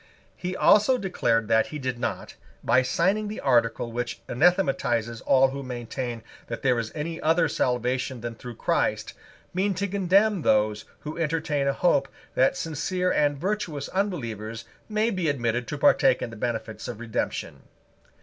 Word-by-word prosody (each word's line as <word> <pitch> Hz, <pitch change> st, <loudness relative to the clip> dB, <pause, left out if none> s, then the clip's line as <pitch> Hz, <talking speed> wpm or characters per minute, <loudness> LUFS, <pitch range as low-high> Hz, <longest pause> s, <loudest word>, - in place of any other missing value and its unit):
He 185 Hz, +1 st, -4 dB
also 215 Hz, +8 st, +5 dB
declared 115 Hz, -, 0 dB
that 110 Hz, 0 st, +4 dB
he 150 Hz, -, -6 dB
did 130 Hz, -4 st, -3 dB
not, -, -, -3 dB, 0.3 s
by 130 Hz, -, +4 dB
signing 190 Hz, +11 st, +1 dB
the 210 Hz, -, -5 dB
article 120 Hz, -3 st, +1 dB
which 120 Hz, 0 st, -3 dB
anathematizes 125 Hz, -, +1 dB
all 135 Hz, 0 st, +5 dB
who 140 Hz, +1 st, -5 dB
maintain 120 Hz, -2 st, -5 dB, 0.2 s
that 115 Hz, -, -6 dB
there 125 Hz, -3 st, +3 dB
is 110 Hz, -1 st, -4 dB
any 160 Hz, +2 st, -4 dB
other 165 Hz, +1 st, +3 dB
salvation 125 Hz, -1 st, -1 dB
than 120 Hz, 0 st, -4 dB
through 120 Hz, +1 st, -9 dB
Christ, -, -, 0 dB, 0.4 s
mean 190 Hz, +2 st, 0 dB
to 200 Hz, +3 st, -1 dB
condemn 200 Hz, +1 st, +2 dB
those 105 Hz, -3 st, +2 dB, 0.2 s
who 155 Hz, +2 st, -6 dB
entertain 155 Hz, -3 st, 0 dB
a 140 Hz, -, +2 dB
hope 140 Hz, -4 st, +2 dB, 0.3 s
that 130 Hz, -, +3 dB
sincere 180 Hz, +4 st, -1 dB
and 145 Hz, -1 st, +2 dB
virtuous 170 Hz, -5 st, -3 dB
unbelievers 115 Hz, -, -3 dB, 0.2 s
may 215 Hz, +2 st, +1 dB
be 180 Hz, -6 st, 0 dB
admitted 120 Hz, -3 st, -1 dB
to -, -, -4 dB
partake -, -, +4 dB
in 115 Hz, -, -4 dB
the -, -, -9 dB
benefits 110 Hz, -1 st, -4 dB
of 120 Hz, -3 st, -6 dB
Redemption. 120 Hz, -2 st, -3 dB
135 Hz, 160 wpm, -26 LUFS, 120-180 Hz, 0.4 s, also